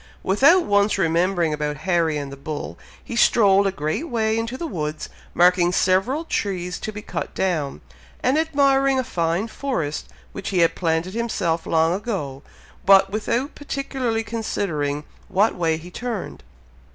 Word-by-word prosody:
Without 280 - +5
once 205 +1 +2
remembering 170 -1 +1
about 150 -1 -2
Harry 170 -4 +2
and 140 -1 -5
the - - -7
bull, 145 +2 -6 0.3
he 235 - -6
strolled 200 -4 +5
a - - +1
great 155 - -3
way 220 -3 +1
into 230 +3 -2
the 340 - -4
woods, 155 - -4 0.3
marking 175 0 +4
several 195 - +1
trees 180 - -2
to 215 - -4
be 210 0 -8
cut - - -5
down, 160 -7 -1 0.4
and 255 +2 +3
admiring 275 -3 +3
a 260 - +1
fine 170 0 -1
forest 190 - -3 0.2
which - - -5
he 185 -3 +2
had 165 - +4
planted 165 +1 -1
himself 195 -8 -1
long 160 +1 +3
ago, 185 - -4 0.4
but 195 -1 +6
without 235 +6 -1
particularly 265 -5 -2
considering 170 -10 -2 0.2
what 200 +4 +2
way 165 -3 0
he 175 +3 -11
turned. 235 - -5
190 Hz, 150 wpm, -22 LUFS, 165-230 Hz, 0.4 s, but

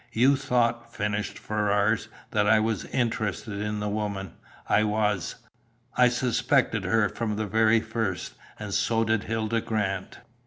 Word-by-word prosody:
"You 130 +5 +5
thought," 120 -3 0
finished 105 -1 -2
Ferrars, 105 +1 +1 0.2
"that 105 -1 +2
I 110 +1 +6
was 110 -3 -1
interested 110 -4 -2
in 105 0 -2
the 105 - -2
woman. 100 -3 -3 0.3
I 110 - +4
was. 105 -4 0 0.6
I 125 0 +6
suspected 125 -1 +1
her 110 -2 +3
from 110 +1 -3
the 110 +1 -2
very 110 +2 +3
first, 110 -5 -3 0.2
and - - -6
so 115 -1 +2
did 110 -2 0
Hilda 110 +1 -1
Grant." 100 -4 -2
110 Hz, 145 wpm, -26 LUFS, 105-115 Hz, 0.6 s, I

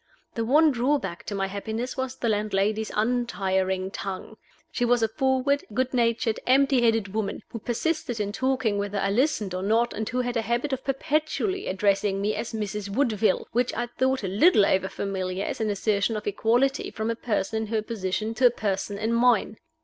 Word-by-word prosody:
The 230 - -2
one 300 +6 +5
drawback 245 -8 -1
to 205 - -3
my 195 0 0
happiness 220 +5 -4
was 260 -1 -3
the 245 - -3
landlady's 210 0 0
untiring 190 -5 0
tongue. 195 +2 -6 0.4
She - - -1
was 240 -1 +3
a - - +4
forward, 265 +4 +1
good 260 +1 0
natured, 230 -2 +1
empty 270 0 +4
headed 225 -4 +1
woman, 215 -1 -2
who 230 - -6
persisted 240 +1 -2
in 205 -1 -1
talking, 235 -2 0
whether 200 0 -2
I 195 0 0
listened 220 - +1
or 185 - -2
not, 225 +4 +2
and 220 +1 -3
who 250 +1 0
had 245 0 -3
a 230 - +2
habit 240 +5 -1
of 265 - -3
perpetually 310 +7 -1
addressing 195 +1 +1
me 205 +2 0
as 235 - -4
"Mrs. 210 -2 -4
Woodville," 220 -4 +1
which 245 +1 0
I 240 - -1
thought 260 +1 -1
a - - -1
little 210 - +5
overfamiliar 190 0 -1
as - - -4
an 220 - 0
assertion 205 +1 0
of 210 - -6
equality 240 +6 +1
from 220 +1 -2
a - - -2
person 220 -1 -1
in 220 - -3
her 215 0 -1
position 215 0 -2
to 245 +2 +5
a - - +5
person 200 -3 -2
in 220 +3 -1
mine. 235 -3 +3
220 Hz, 190 wpm, -26 LUFS, 200-250 Hz, 0.4 s, one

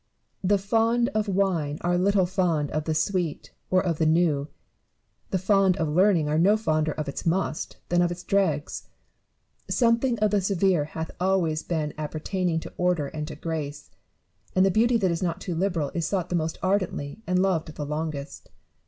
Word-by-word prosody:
The 200 +2 +3
fond 230 +4 +2
of 215 -5 -1
wine 180 -7 0
are 175 0 +1
little 190 +1 +3
fond 175 -5 0
of 155 0 -2
the 160 - -1
sweet 175 -1 -1 0.2
or 185 +1 +2
of 170 -3 -1
the 160 - +3
new: 155 -3 +2 0.8
the 190 - 0
fond 190 0 +3
of 160 - 0
learning 175 -1 +3
are 155 +1 +1
no 200 +5 +5
fonder 155 -7 0
of 155 - -4
its 140 - -5
must 170 -1 -1
than 175 0 +3
of 175 - +2
its 175 +1 -6
dregs. 170 -7 -1 0.8
Something 235 +1 +2
of 215 -1 +2
the 205 -1 +2
severe 190 -4 +2
hath 160 +1 -6
always 175 -4 +1
been 155 -3 -2
appertaining 160 +3 -2
to - - -9
order 175 -5 +1
and 150 -1 -5
to 155 - -7
grace; 150 -2 -5 0.6
and 185 +1 +5
the 195 - +3
beauty 235 +5 +3
that 190 -5 +1
is 165 - -2
not 175 -1 -1
too 180 - -4
liberal 165 -4 -1
is 165 -2 -1
sought 185 -3 -1
the 180 - -1
most 160 -1 -1
ardently 185 -3 -1
and 180 0 +1
loved 175 -5 0
the 150 - -4
longest. 150 -1 -5
175 Hz, 185 wpm, -26 LUFS, 155-195 Hz, 0.8 s, no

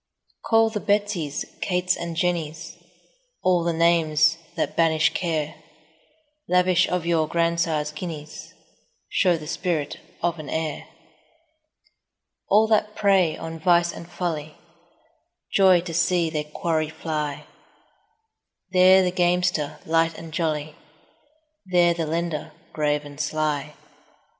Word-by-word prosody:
Call 225 0 +3
the 215 - -2
Betsies, 200 -8 -1 0.2
Kates, 180 0 +1
and 170 -1 -5
Jennies, 165 -1 -2 0.7
All 180 -2 +3
the 170 - +1
names 165 -1 +3 0.2
that 165 - -2
banish 160 -1 +3
care; 160 -4 -1
10 - - -23 0.9
Lavish 180 0 +3
of 180 -2 -1
your 165 -2 +1
grandsire's 165 -2 0
guineas, 150 -1 -8 0.6
Show 180 -3 +2
the 155 - -9
spirit 155 -2 -2 0.2
of 170 -1 0
an 150 - -8
heir. 160 -2 -3 1.6
All 210 +2 +5
that 215 -1 +1
prey 190 -5 +3
on 165 0 -7
vice 175 0 +3
and 170 - -10
folly 155 -4 -4 1.0
Joy 190 -3 +5
to 170 -1 -7
see 175 -1 +1
their 150 -2 -2
quarry 155 0 -1
fly: 155 -2 -4 1.3
There 185 0 +6
the 180 - 0
gamester, 180 -3 +1
light 165 0 +1
and 160 -1 -10
jolly, 155 -2 -2 1.0
15 - - -12
There 175 -1 +5
the 165 -2 -3
lender, 165 -1 -3 0.2
grave 150 -1 0
and 145 0 -11
sly. 150 -1 -2
165 Hz, 125 wpm, -24 LUFS, 155-180 Hz, 1.6 s, There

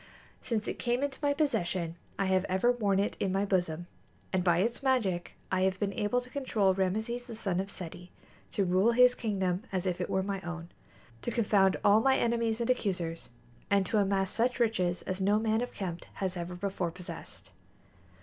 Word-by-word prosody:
Since 220 -3 -2
it - - -3
came 245 +2 0
into 285 -1 -2
my 290 -1 +2
possession 185 - 0 0.2
I 195 - +1
have 190 -1 +2
ever 190 +7 +2
worn 205 -5 +1
it 200 +1 0
in 195 - 0
my 195 +2 +1
bosom, 175 -4 0 0.5
and 185 -1 +2
by 175 -2 +4
its 230 +6 0
magic 225 -10 +1 0.2
I 185 -1 +2
have 190 0 +1
been 200 -1 -1
able 245 +4 0
to 250 - -13
control 215 -9 +1
Rameses 220 +6 -1
the 235 -3 -8
son 195 -5 -1
of 195 +1 -2
Seti, 180 -1 -8 0.4
to 200 - +1
rule 185 +6 +3
his 250 +1 +6
kingdom 190 -6 -1
as 185 -1 -1
if 180 -1 -1
it - - -2
were 190 - +1
my 195 -1 -3
own, 170 -1 -6 0.5
to - - -2
confound 205 -4 +3
all 205 +2 +6
my 265 +2 +4
enemies 230 -1 +1
and 235 +1 +2
accusers, 180 -8 -2 0.4
and 200 -1 +3
to 215 +3 +1
amass 195 -1 +1
such 245 +3 0
riches 185 -7 +1
as 185 +1 -3
no 205 +2 +4
man 220 +1 +1
of 245 - -3
Qemt 175 -4 -5
has 190 -2 -2
ever 175 0 -4
before 185 -1 -2
possessed. 180 +1 -9
195 Hz, 195 wpm, -30 LUFS, 185-230 Hz, 0.5 s, his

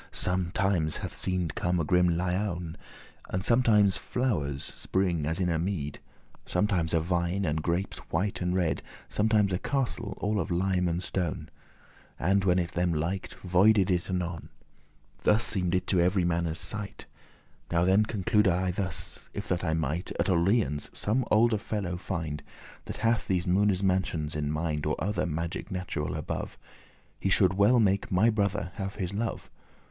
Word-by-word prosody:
Sometimes 90 -2 +1
hath - - -6
seemed 90 -5 0
come 90 -2 0
a - - +1
grim 90 +2 +3
lioun, 90 -1 -1 0.5
And 95 +1 -2
sometimes 110 -5 +4
flowers 75 - -1
spring 90 -5 -1
as 80 +3 -1
in 90 - +1
a 85 -2 +1
mead; 85 -5 -3 0.5
Sometimes 90 -3 +1
a - - +4
vine, 90 +3 0
and 80 -1 0
grapes 85 +4 -2
white 95 +5 -1
and 90 0 0
red; 85 -6 0 0.3
Sometimes 105 -2 +2
a 90 - 0
castle 125 -5 -2
all 105 +1 0
of 85 - -2
lime 90 0 +1
and 85 +2 -1
stone; 85 -4 -3 0.7
And, 95 +3 +2
when 90 -1 +4 0.2
them 90 -1 +1
liked, 85 +5 -2
voided* 95 +2 +4
it 90 +1 0
anon: 90 -3 -3
*vanished - - -33 0.7
Thus 110 +2 +3
seemed 90 -3 0
it 90 - 0
to 95 - +2
every 90 +1 +3
manne's 85 -1 0
sight. 105 +1 -3 0.7
Now 85 0 +3
then 95 +3 +5
conclude 105 0 +1
I 90 +1 +1
thus; 90 -2 -4
if - - -4
that 90 -1 0
I 80 -2 0
might 80 +3 -2
At - - +2
Orleans 85 - +1
some 115 +5 0
olde 110 -1 +3
fellow 100 -6 -3
find, 85 -5 -4 0.4
That - - -6
hath 115 0 +2
these 90 -2 +1
Moone's 95 +1 +2
mansions 90 -5 0
in 75 -1 -1
mind, 75 -1 -1
Or 75 - +1
other 95 -2 -1
magic 85 +1 -3
natural 90 -5 -3
above. - - -4 0.6
He 95 - 0
should 95 0 +4
well 100 +6 +4
make 100 +1 +2
my 105 +5 +4
brother 100 -4 -1
have 95 -1 -4
his 95 -2 -3
love. 110 +3 -3
90 Hz, 165 wpm, -28 LUFS, 85-100 Hz, 0.7 s, then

